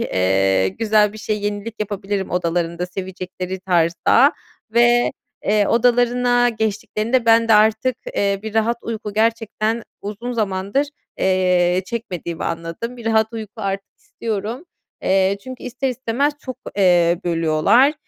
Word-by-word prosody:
eee, 95 0 +2
güzel 215 -2 +2
bir 215 - -10
şey, 210 0 -2
yenilik 205 +2 -3
yapabilirim 200 -1 -3
odalarında 170 0 -1
sevecekleri 185 0 -6
tarzda 180 - +3 0.4
ve, 240 +2 +4 0.3
eee, 205 0 +3
odalarına 245 0 +3
geçtiklerinde 220 +2 -1
ben 230 0 +5
de 220 - +6
artık, 220 +4 +3 0.2
eee, 200 -1 +1
bir 220 0 -6
rahat 225 +2 +2
uyku 215 -2 -5
gerçekten 225 0 0 0.2
uzun 215 +5 -5
zamandır, 205 +4 -1 0.3
eee, 180 -1 +2
çekmediğimi 180 -7 -5
anladım. 170 +9 -4
Bir 235 - -11
rahat 220 0 +2
uyku 220 -3 -6
artık 195 -1 -4
istiyorum. 225 - -5 0.4
Eee, 190 +1 +2
çünkü 255 -1 -8
ister 260 +2 -2
istemez 260 +3 0
çok, 255 -2 -7 0.2
eee, 175 -3 +4
bölüyorlar. 170 - +3
210 Hz, 125 wpm, -20 LUFS, 185-230 Hz, 0.4 s, de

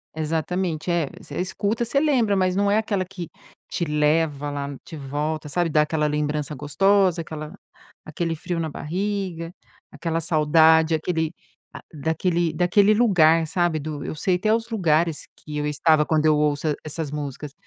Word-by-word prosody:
Exatamente. 160 +2 -2
É, 170 -4 +1
você 145 - -7
escuta, 200 +5 -1
você 260 +4 +1
lembra. 255 -9 +2
Mas 185 -1 +1
não 200 +1 +2
é 205 - +3
aquela 205 -4 0
que 180 -3 -8 0.4
te 170 - -2
leva 150 -1 +1
lá 140 0 -4
de 160 - -9
volta, 150 +2 -3
sabe, 175 +3 0
dá 150 -1 +4
aquela 150 0 -1
lembrança 150 0 -2
gostosa, 180 +5 +2
aquela 155 -1 -7 0.5
aquele 165 +1 -3
frio 170 +2 -4
na 160 - -1
barriga, 180 +1 -3 0.4
aquela 165 -1 -3
saudade, 160 0 +4
aquele 160 0 -1 0.4
a - - -8
daquele 165 +3 0
daquele 190 +5 +4
lugar, 165 -8 +4
sabe, 170 -1 0
do 150 -1 -5
eu - - -4
sei 180 +4 0
até 215 +4 +1
os 225 0 -1
lugares 165 -7 +1
que 150 -1 -7
eu 150 - -1
estava 150 +1 +3
quando 155 0 +1
eu 155 -1 +5
ouço 150 +1 0
e 150 - +1
essas 155 0 -4
músicas. 145 -1 -6
160 Hz, 165 wpm, -23 LUFS, 150-180 Hz, 0.5 s, eu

